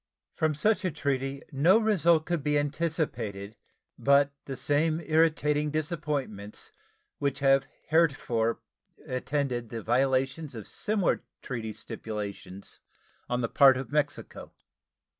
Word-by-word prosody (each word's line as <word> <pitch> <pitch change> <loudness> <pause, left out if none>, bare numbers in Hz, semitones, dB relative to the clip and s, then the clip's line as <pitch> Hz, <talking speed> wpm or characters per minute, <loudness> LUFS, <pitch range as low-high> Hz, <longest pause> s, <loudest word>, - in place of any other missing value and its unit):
From 155 -1 0
such 210 +8 +2
a 185 - +1
treaty 135 -2 -2
no 160 +9 +5
result 170 -8 +3
could 175 -3 -1
be 150 0 +2
anticipated 145 - -2 0.4
but 140 0 +4
the 135 -2 -5
same 155 +2 +1
irritating 155 -2 +2
disappointments 145 - -3 0.5
which 140 -1 0
have 135 -1 +3 0.2
heretofore 135 -8 +2 0.4
attended 130 -2 -2
the 115 -2 -5
violations 135 +4 +1
of 110 -3 -8
similar 205 -4 0 0.2
treaty 115 -4 -4
stipulations 100 -3 -6 0.5
on 125 0 0
the 115 - 0
part 135 +2 +6
of 130 -3 -6
Mexico. 145 -1 -2
140 Hz, 115 wpm, -28 LUFS, 125-155 Hz, 0.5 s, part